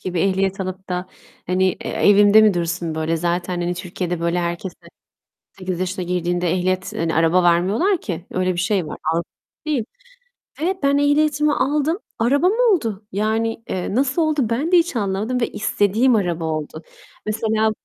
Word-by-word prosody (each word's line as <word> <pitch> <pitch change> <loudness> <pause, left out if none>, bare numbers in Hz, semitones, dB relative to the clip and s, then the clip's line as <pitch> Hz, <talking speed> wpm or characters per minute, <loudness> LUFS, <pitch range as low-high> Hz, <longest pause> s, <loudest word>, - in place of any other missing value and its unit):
gibi 180 -2 -2
ehliyet 195 +1 0
alıp 190 0 -5
da, 180 0 -3 0.4
hani, 185 +1 +1
e - - -5
evimde 205 +1 +5
mi 215 -3 +4
dursun 170 -1 -2
böyle? 160 +1 -1
Zaten, 175 +1 -2
hani, 175 +1 -1
Türkiye'de 180 -1 -4
böyle, 170 +1 0
herkese 175 +1 -4
18 185 -2 -10
yaşına 185 0 -2
girdiğinde 175 0 -1
ehliyet 185 +1 -1
hani, 165 0 -1
araba 165 +3 +3
vermiyorlar 195 - +2
ki. 175 -3 -5
Öyle 185 0 0
bir 175 - -6
şey 185 -3 0
var. - - -7
Avrupa 165 +1 0 0.4
değil. 285 -7 0 0.8
Ve 370 +4 0
ben 280 0 +3
ehliyetimi 295 +1 +2
aldım, 300 +5 0 0.2
arabam 285 - +3
oldu. 330 - +1
Yani, 220 +3 -1
eee, 185 +1 -3
nasıl 275 +6 +1
oldu 310 -2 +1
ben 285 +10 -1
de 360 - +7
hiç 335 -5 0
anlamadım 210 +4 -1
ve 235 - +1
istediğim 220 +4 +2
araba 175 -6 0
oldu. 155 0 -4 0.4
Mesela 220 0 +1
190 Hz, 160 wpm, -21 LUFS, 175-240 Hz, 0.8 s, de